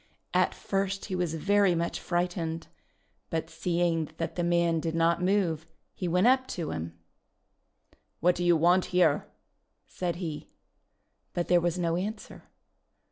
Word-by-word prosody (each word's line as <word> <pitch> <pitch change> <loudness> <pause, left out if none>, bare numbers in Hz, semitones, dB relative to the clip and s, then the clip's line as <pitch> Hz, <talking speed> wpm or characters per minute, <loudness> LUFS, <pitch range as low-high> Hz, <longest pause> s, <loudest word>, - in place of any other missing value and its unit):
At - - +2
first 195 0 -2
he 185 - -3
was 175 -3 -1
very 200 +2 +3
much 170 0 -1
frightened, 175 -2 -2 0.6
but 165 -1 -3
seeing 170 -3 0
that 165 - -3
the 175 - -1
man 170 -1 +2
did 165 0 -2
not 165 +1 +2
move, 180 -4 +1 0.3
he 180 - -4
went 180 +4 +2
up 260 +1 +4
to 165 -3 -3
him. 80 0 -5 1.2
'What 180 +2 +4
do 175 - -3
you 175 -1 +5
want 175 +3 +4
here?" 175 -5 +2 0.6
said 175 -2 -3
he. 165 -4 -5 0.8
But 175 - -2
there 175 -1 +5
was 175 0 0
no 170 -1 0
answer. 210 +4 -6
175 Hz, 145 wpm, -28 LUFS, 165-180 Hz, 1.2 s, you